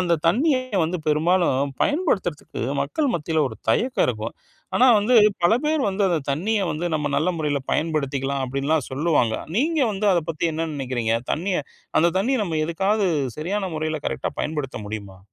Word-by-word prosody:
அந்தத் 170 -4 0
தண்ணியை 260 - +3 0.2
வந்து 175 +3 -1
பெரும்பாலும் 150 -3 +2
பயன்படுத்துறதுக்கு 240 - -1 0.2
மக்கள் 260 - 0
மத்தியில 160 -1 0
ஒரு 110 - -10
தயக்கம் 250 - +2
இருக்கும். - - -3 0.4
ஆனா 255 - +6
வந்து, 220 +5 +2 0.3
பல 175 +6 +5
பேர் 305 -1 +1
வந்து 200 +1 -1
அந்தத் 160 -6 -1
தண்ணிய 200 +9 0
வந்து 170 +3 -2
நம்ம 150 -1 -1
நல்ல 170 +5 +2
முறையில 145 -3 -1
பயன்படுத்திக்கலாம் 140 -3 -1
அப்டின்னுலாம் 140 +2 -1
சொல்லுவாங்க. 135 -5 +1 0.2
நீங்க 310 +4 +1
வந்து 205 +1 0
அதப் 170 -3 0
பத்தி 165 +1 -1
என்ன 165 +1 -2
நெனைக்கிறீங்க? 120 -4 -1 0.2
தண்ணிய 175 -1 -1 0.4
அந்தத் 170 +2 +3
தண்ணிய 255 +7 +1
நம்ம 160 -4 -2
எதுக்காவது 195 +4 +1 0.3
சரியான 190 +4 -2
முறையில 155 0 -2
கரெக்டா - - -2
பயன்படுத்த 150 -5 -3
முடியுமா? 100 -3 -7
165 Hz, 155 wpm, -23 LUFS, 145-200 Hz, 0.4 s, ஆனா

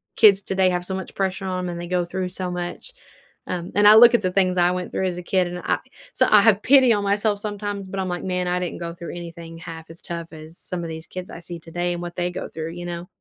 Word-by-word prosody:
kids 200 -3 +6
today 190 -1 +2
have 180 -1 -2
so 190 - -3
much 190 - -6
pressure 195 0 -2
on 185 -1 -2
'em, - - -3
and 170 -1 -5
they 175 - -6
go 180 0 0
through 185 +1 -3
so 185 0 -4
much. 175 - -5 0.6
Um, 180 0 -4
and 205 +1 +6
I 210 - +10
look 235 +2 +9
at 230 - +1
the 185 - +1
things 185 -1 +2
I 175 0 +4
went 180 0 -4
through 190 - -1
as 180 -2 -2
a - - -8
kid, 185 +1 +1
and 175 0 -5
I - - 0 0.4
so - - +3
I 210 - +7
have 210 -1 +4
pity 260 -2 +6
on 205 -1 0
myself 205 +1 +1
sometimes, 205 -1 -4
but 195 +1 -5
I'm 190 -1 -2
like, 175 -1 -3
"Man, 180 -1 -1
I 180 0 +1
didn't 180 -2 -4
go 170 -1 -5
through 170 -1 -7
anything 170 -1 -8
half 165 -1 -9
as 165 - -12
tough 170 -1 -6
as 160 +1 -11
some 180 -1 -5
of 165 - -5
these 160 0 -7
kids 185 0 -7
I 165 - -9
see 170 0 -7
today 175 +2 -3
and 175 - -5
what 175 0 -6
they 175 0 -1
go 180 - -6
through," 160 0 -5
you 175 +1 -7
know? 175 0 -5
180 Hz, 285 wpm, -23 LUFS, 175-195 Hz, 0.6 s, I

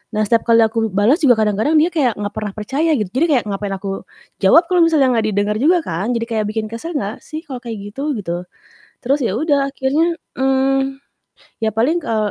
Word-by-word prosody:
Nah, 215 - +2
setiap 230 +2 +1
kali 230 -1 +5
aku 225 0 0
bales 210 - +2
juga 265 -7 +5
kadang-kadang 215 +9 +1
dia 315 +3 +4
kayak 270 -9 +1
nggak 205 0 -4
pernah 210 -2 -5
percaya 280 +9 0
gitu, 210 -6 -3
jadi 270 +8 +2
kayak 270 -6 +2
ngapain 195 0 -3
aku 195 0 -6 0.3
jawab 250 - +6
kalau 360 - +3
misalnya 310 -6 +4
nggak 225 -2 +1
didenger 205 0 0
juga 335 +8 +4
kan, 195 - -2
jadi 230 - -1
kayak 215 -2 0
bikin 215 0 -3
kesel 320 +9 -6
nggak 210 -6 -3
sih 310 +1 -8
kalau 265 -7 -7
kayak 220 -4 -7
gitu? 280 +5 -3
Gitu. 180 -4 -4 0.5
Terus 270 +3 +1
yaudah 280 - +1
akhirnya, 300 +6 +1 0.2
mmm, 270 0 +1 0.6
ya 220 -2 -1
paling, 255 +10 +2
kal 220 -9 -1
235 Hz, 200 wpm, -18 LUFS, 210-285 Hz, 0.6 s, jawab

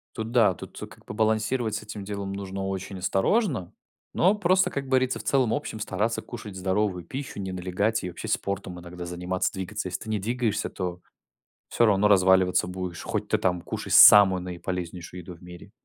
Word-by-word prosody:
Тут 110 +1 -4
да, 115 -6 +4
тут - - -11
как - - -17
бы - - -7
балансировать 110 +1 0
с - - -4
этим 105 -1 -7
делом 100 -1 -5
нужно 95 0 -5
очень 95 0 -5
осторожно, 105 - 0 0.4
но 185 +5 +3
просто, 185 -2 +2
как 140 -1 -4
говорится, 130 -1 +1
в - - -8
целом-общем 125 -4 0
стараться 110 +2 -1
кушать 110 -5 -9
здоровую 95 -1 -1
пищу, 130 +4 -6
не 95 -1 -4
налегать 95 +5 -1
и 90 - -3
вообще 85 - -8
спортом 100 -2 -3
иногда 90 0 -8
заниматься, 90 +1 -2
двигаться. 95 0 -4
Если 90 - -4
ты 110 - -8
не 110 -1 0
двигаешься, 110 0 -1
то 90 -2 -5 0.7
всё 120 - +2
равно 105 -1 +4
разваливаться 95 -2 +4
будешь, 90 -1 -5
хоть - - -3
ты - - +3
там 90 -1 0
кушай - - -6
самую 95 -3 +9
наиполезнейшую 90 0 -6
еду 90 +1 -9
в 85 - -19
мире. 90 0 -12
95 Hz, 180 wpm, -26 LUFS, 90-110 Hz, 0.7 s, самую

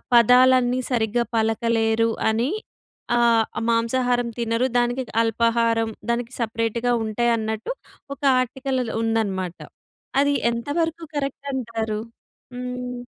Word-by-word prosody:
పదాలన్నీ 250 +1 +5
సరిగ్గా 235 0 +1
పలకలేరు 225 0 +1 0.2
అని. 230 +6 0 0.7
ఆహ్, 230 -2 +4 0.2
మాంసాహారం 245 +1 +1
తినరు. 230 +1 +1
దానికి 245 +2 +1 0.2
అల్పాహారం, 230 0 +1 0.2
దానికి 235 +1 -2
సపరేట్‌గా 230 +1 -1
ఉంటాయన్నట్టు 220 - -1 0.4
ఒక - - -39 0.2
ఆర్టికల్‌లో 255 0 -2 0.2
ఉందనమాట. 195 -6 -1 0.6
అది 285 0 +2 0.2
ఎంతవరకు 325 +8 -2
కరెక్ట్ 280 0 -3
అంటారు? 225 -4 -3 0.6
హ్మ్. 250 0 -5
235 Hz, 90 wpm, -23 LUFS, 225-250 Hz, 0.7 s, పదాలన్నీ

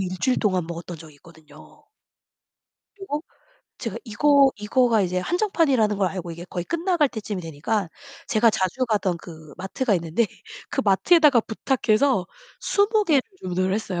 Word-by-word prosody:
1 185 -1 -4
주일 255 -1 +2
동안 185 -5 0
먹었던 170 +1 -7
적이 155 -2 -14
있거든요. 160 +1 -18 1.1
그리고 340 -6 -5 0.6
제가 - - -5
이거 275 +5 +4
이거가 225 +1 +2
이제 180 0 -1
한정판이라는 275 - +1
걸 190 - +2
알고 175 -2 -6 0.2
거의 175 - -4
끝나갈 340 - +1
때 220 -4 -6
쯤이 205 -4 -5
되니까 165 +6 -2 0.4
제가 230 0 +3
자주 200 +6 -1
가던 190 -6 0
그 160 -4 -12
마트가 205 +5 -1
있는데 170 +6 0 0.4
그 - - 0
마트에다가 280 - +5
부탁해서 220 -3 +1 0.3
20 420 +1 +2
개를 295 -7 +3 0.2
주문을 185 +1 -1
했어요. 200 -4 -3
210 Hz, 325 characters per minute, -23 LUFS, 180-270 Hz, 1.1 s, 마트에다가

